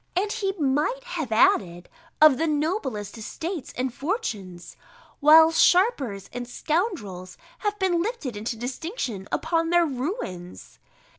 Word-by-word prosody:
And, 400 +3 0
he 400 -4 -1
might 305 - 0
have 330 - -5
added, 175 -5 +2 0.3
of 305 -3 +7
the 325 - +1
noblest 290 - -2
estates 320 - -5
and 255 -1 -2
fortunes; 215 - -4 0.4
while 320 +2 +7
sharpers 295 - +2
and 245 0 -5
scoundrels 245 - -3 0.2
have 415 -1 -2
been 370 -3 +1
lifted 360 - -4
into 225 +3 -4
distinction 245 - -5
upon 330 0 0
their 345 0 +4
ruins. 255 - -6
300 Hz, 125 wpm, -25 LUFS, 225-360 Hz, 0.4 s, of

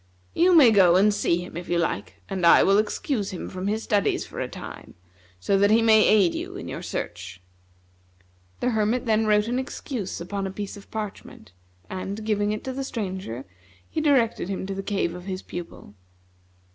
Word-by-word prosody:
You 355 +2 +4
may 270 -8 +8
go 185 -5 +6
and 205 +3 +4
see 175 -3 0
him, - - -12
if 175 +1 -7
you 175 - +1
like, 170 -1 -3
and 190 -2 -4
I 170 - +7
will 195 +1 +4
excuse 215 0 -1
him 185 - -6
from 185 +1 -5
his 215 +2 -1
studies 205 -2 +1
for - - -9
a - - -2
time, - - -10 0.4
so 195 - +1
that 200 +1 +4
he 225 +1 +4
may 220 -1 +6
aid 200 -5 +4
you - - -5
in - - -7
your - - -5
search." 85 +2 -6 1.2
The 250 - +1
Hermit 220 +3 0
then 220 -1 +2
wrote 210 0 +3
an 245 +2 0
excuse 255 -5 -5
upon 195 +3 -4
a - - -5
piece 200 +1 -6
of 200 - -14
parchment, 205 - -7 0.4
and, 195 +3 -5
giving 205 -1 +1
it 215 - -4
to 260 - -4
the 270 +1 -3
Stranger, 190 - -5 0.4
he 315 - -3
directed 250 - +2
him 195 -1 -3
to 195 - -4
the 195 - -4
cave 195 -4 -1
of 180 0 -9
his 190 -1 -5
pupil. 175 -11 -9
205 Hz, 195 wpm, -25 LUFS, 185-220 Hz, 1.2 s, may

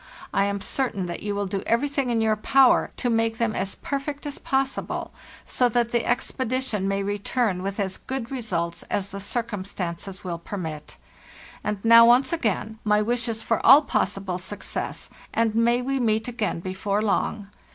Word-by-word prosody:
I 200 - +3
am 200 0 -2
certain 225 -8 -1
that 175 -1 -5
you 205 -1 -2
will 200 0 -1
do 195 0 -3
everything 275 +2 +1
in 230 -2 +1
your 220 -1 +3
power 265 +4 +4
to 250 - -1
make 225 -1 +1
them 230 -2 0
as 195 0 -2
perfect 285 +1 -4
as 290 -1 -5
possible, 270 0 -2 0.3
so 250 -1 +2
that 235 0 +1
the 235 -1 +1
expedition 255 -6 -1
may 195 0 0
return 205 0 -1
with 195 +2 -4
as 190 -2 -1
good 260 -2 -5
results 180 -10 -2
as 200 0 -2
the 200 - -5
circumstances 195 -4 -4
will 175 -2 -4
permit. 160 -5 -6 0.7
And 210 0 -3
now 230 0 +9
once 250 +6 +4
again, 220 - -1
my 210 0 +3
wishes 230 -1 -1
for 230 - 0
all 290 +3 +9
possible 195 -7 -1
success, 205 +3 -5 0.2
and 225 -1 +2
may 235 +2 +2
we 270 +1 -1
meet 220 -2 +1
again 225 -8 -2
before 195 +3 -1
long. 205 -1 -1
220 Hz, 170 wpm, -25 LUFS, 195-245 Hz, 0.7 s, now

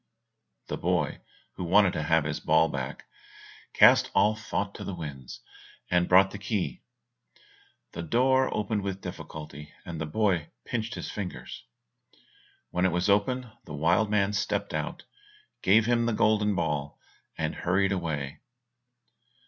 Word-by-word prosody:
The - - -4
boy, - - -1 0.4
who - - -4
wanted 95 +2 +4
to - - -2
have 80 +1 +2
his 75 0 -3
ball 80 - +3
back, 65 -2 -5 0.7
cast - - +6
all 110 +1 +4
thought 100 -2 -3
to - - -8
the 95 - -5
winds, 75 -7 -8 0.5
and 90 0 +2
brought 95 +1 +6
the 105 - -7
key. 100 -1 -2 1.1
The 85 - -6
door 130 +9 +2
opened 105 0 -1
with 95 -1 -4
difficulty, 75 -4 -8
and 85 -2 -6
the 80 - -2
boy 95 -2 0 0.2
pinched 115 0 -3
his - - -5
fingers. 100 -4 -7 1.1
When 90 +1 +2
it - - 0
was 90 +4 +1
open 120 +4 +1
the 75 - -7
wild 85 +8 +2
man 105 -1 +2
stepped 100 - -1
out, - - -3 0.6
gave 110 +4 +5
him 120 0 +2
the 120 - +1
golden 105 -1 +2
ball, 75 -4 -2 0.4
and - - -1
hurried 95 +2 +1
away. 80 -7 -3
95 Hz, 145 wpm, -28 LUFS, 80-105 Hz, 1.1 s, cast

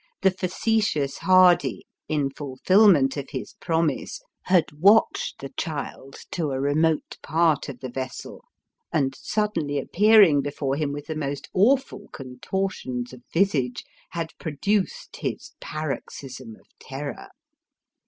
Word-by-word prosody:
The 190 - +5
facetious 185 -6 0
Hardy, 185 -2 +4 0.2
in 145 -3 0
fulfilment 145 +2 +3
of 140 -1 -5
his - - -6
promise, 165 -2 -1 0.3
had 180 -3 +3
watched 205 +6 +4
the 135 - -6
child 140 -3 -5 0.2
to 160 -4 -1
a 135 -1 -2
remote 150 +3 0
part 160 -2 +1
of 125 -3 -9
the 130 - -5
vessel, 130 +1 -6 0.5
and, 135 -3 +1
suddenly 170 -10 -1
appearing 195 -1 +5
before 140 -1 -2
him 145 -1 -1
with 145 0 -6
the 160 - -5
most 140 -2 -4
awful 230 0 +2
contortions 130 -2 -4
of 125 - -12
visage, 150 -9 +1 0.3
had 165 -1 -4
produced 185 +6 -2
his - - -4
paroxysm 135 -5 -6
of - - -27
terror. 140 +1 -7
150 Hz, 125 wpm, -24 LUFS, 135-185 Hz, 0.5 s, The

